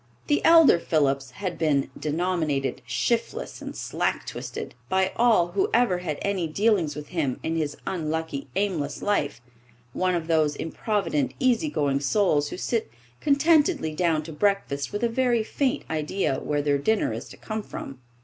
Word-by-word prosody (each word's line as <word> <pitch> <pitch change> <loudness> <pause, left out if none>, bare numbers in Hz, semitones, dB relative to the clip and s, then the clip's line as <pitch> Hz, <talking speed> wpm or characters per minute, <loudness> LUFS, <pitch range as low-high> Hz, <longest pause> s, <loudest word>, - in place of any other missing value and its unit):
The 295 - +1
elder 325 - +7
Phillips 140 -5 +1
had 180 +7 -5
been 145 -4 +1
denominated 155 -3 -1
"shiftless 235 -1 -1
and - - -7
slack - - -2
twisted" - - -6 0.2
by 190 0 +2
all 225 -8 +4
who 190 +2 0
ever 230 -7 +3
had 155 -5 -3
any 195 -4 0
dealings 180 -3 +1
with 150 0 -8
him 150 -8 -1
in 165 - -1
his 150 -2 -2
unlucky, 160 -4 -3
aimless 165 -8 -1
life 175 - 0 0.5
one 185 -1 +1
of 165 -2 -2
those 155 -3 +2
improvident, 165 - -1
easygoing 235 - +1
souls 145 -1 +2
who - - -6
sit 230 +3 -1 0.3
contentedly 295 - +3
down 160 -2 +1
to 160 +1 -8
breakfast 150 -6 0
with 205 +3 -3
a - - +4
very 240 -1 +1
faint 270 +5 -1
idea 155 -1 -1
where 145 -1 -1
their 145 -1 +2
dinner 220 +9 +1
is - - -6
to - - -12
come 215 0 -4
from. 135 -9 -8
170 Hz, 160 wpm, -25 LUFS, 150-215 Hz, 0.5 s, elder